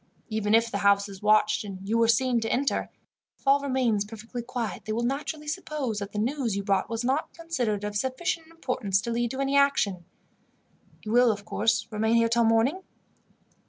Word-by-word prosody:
Even 215 Hz, -1 st, +1 dB
if 230 Hz, 0 st, +2 dB
the 200 Hz, -, -2 dB
house 200 Hz, 0 st, +3 dB
is 195 Hz, -2 st, -11 dB
watched, 215 Hz, 0 st, +3 dB
and 195 Hz, -1 st, -8 dB
you 220 Hz, -, 0 dB
were 230 Hz, 0 st, +4 dB
seen 240 Hz, +1 st, +3 dB
to 225 Hz, 0 st, -2 dB
enter, 275 Hz, +2 st, 0 dB, 0.5 s
if -, -, -31 dB
all 275 Hz, +1 st, +6 dB
remains 255 Hz, -7 st, +1 dB
perfectly 225 Hz, +3 st, -7 dB
quiet 235 Hz, -4 st, -5 dB
they 215 Hz, -, -3 dB
will 235 Hz, +2 st, -1 dB
naturally 295 Hz, +4 st, -3 dB
suppose 295 Hz, -, -3 dB
that 200 Hz, 0 st, -6 dB
the -, -, -7 dB
news 240 Hz, 0 st, -1 dB
you 200 Hz, -, -2 dB
brought 195 Hz, +2 st, 0 dB
was 230 Hz, +1 st, -3 dB
not 265 Hz, +5 st, 0 dB
considered 250 Hz, -12 st, -2 dB
of 205 Hz, 0 st, -4 dB
sufficient 320 Hz, -, -2 dB
importance 250 Hz, -, -1 dB
to 235 Hz, +4 st, -4 dB
lead 235 Hz, 0 st, 0 dB
to 260 Hz, -, -5 dB
any 275 Hz, +1 st, 0 dB
action. 205 Hz, -11 st, +2 dB, 1.0 s
You 215 Hz, -, -5 dB
will, 245 Hz, 0 st, +5 dB
of 205 Hz, -1 st, -6 dB
course, 225 Hz, +2 st, 0 dB
remain 220 Hz, +1 st, +1 dB
here 230 Hz, 0 st, +3 dB
till 235 Hz, 0 st, +3 dB
morning?" 225 Hz, +11 st, +2 dB
230 Hz, 195 wpm, -27 LUFS, 210-265 Hz, 1.0 s, all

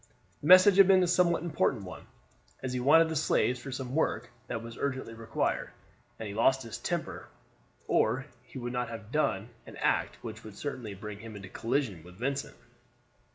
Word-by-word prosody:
The 145 Hz, -, -4 dB
message 185 Hz, +2 st, +8 dB
had 195 Hz, -2 st, +8 dB
been 190 Hz, -1 st, +6 dB
a -, -, +2 dB
somewhat 175 Hz, -2 st, +3 dB
important 150 Hz, -, 0 dB
one, 90 Hz, -, -10 dB, 0.6 s
as 130 Hz, -1 st, -3 dB
he 125 Hz, -, -1 dB
wanted 160 Hz, +6 st, +6 dB
the 160 Hz, -, -3 dB
slaves 125 Hz, -4 st, +1 dB
for 135 Hz, -, -7 dB
some 130 Hz, -1 st, -5 dB
work 120 Hz, -6 st, 0 dB, 0.2 s
that 115 Hz, -, -4 dB
was 115 Hz, 0 st, -8 dB
urgently 130 Hz, -4 st, -3 dB
required; 115 Hz, 0 st, -2 dB, 0.5 s
and 110 Hz, -, -6 dB
he 100 Hz, -, -6 dB
lost 130 Hz, +5 st, +3 dB
his 115 Hz, -, -7 dB
temper, -, -, -4 dB, 0.6 s
or 135 Hz, +2 st, +2 dB, 0.2 s
he -, -, -12 dB
would 120 Hz, -1 st, -4 dB
not 125 Hz, -1 st, -2 dB
have 110 Hz, -1 st, -8 dB
done 120 Hz, -8 st, 0 dB, 0.2 s
an -, -, -10 dB
act -, -, 0 dB
which 110 Hz, +1 st, -7 dB
would 110 Hz, -2 st, -11 dB
certainly 125 Hz, -8 st, -5 dB
bring 105 Hz, 0 st, -8 dB
him 110 Hz, 0 st, -9 dB
into 100 Hz, -2 st, -9 dB
collision 115 Hz, -, -1 dB
with 90 Hz, +1 st, -14 dB
Vincent. 135 Hz, +4 st, -3 dB
125 Hz, 190 wpm, -30 LUFS, 110-145 Hz, 0.6 s, message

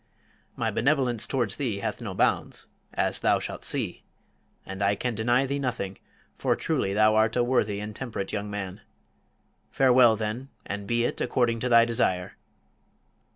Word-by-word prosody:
"My -, -, -1 dB
benevolence 125 Hz, -3 st, +1 dB
towards 120 Hz, -7 st, -1 dB
thee 125 Hz, -8 st, -1 dB
hath 100 Hz, -, -4 dB
no -, -, -5 dB
bounds -, -, +1 dB, 0.3 s
as -, -, -1 dB
thou -, -, +3 dB
shalt -, -, -5 dB
see; -, -, -1 dB, 0.6 s
and 95 Hz, +1 st, -7 dB
I 100 Hz, +1 st, +3 dB
can 125 Hz, +3 st, -2 dB
deny 120 Hz, +4 st, +2 dB
thee 140 Hz, +1 st, -2 dB
nothing, 115 Hz, -8 st, -3 dB, 0.4 s
for -, -, +2 dB
truly 95 Hz, -, -1 dB
thou 110 Hz, +1 st, +5 dB
art 110 Hz, +1 st, +3 dB
a 120 Hz, -, +3 dB
worthy 110 Hz, -5 st, +1 dB
and 105 Hz, 0 st, -6 dB
temperate 115 Hz, -7 st, -5 dB
young 105 Hz, -1 st, -3 dB
man. 100 Hz, 0 st, -5 dB, 0.9 s
Farewell, 125 Hz, -3 st, +5 dB
then, 110 Hz, +5 st, -4 dB, 0.2 s
and 100 Hz, 0 st, -5 dB
be 120 Hz, +1 st, +1 dB
it -, -, -2 dB
according 120 Hz, -2 st, +1 dB
to 125 Hz, -, -1 dB
thy 115 Hz, -1 st, +7 dB
desire." 95 Hz, -6 st, -1 dB
115 Hz, 160 wpm, -27 LUFS, 105-125 Hz, 0.9 s, thy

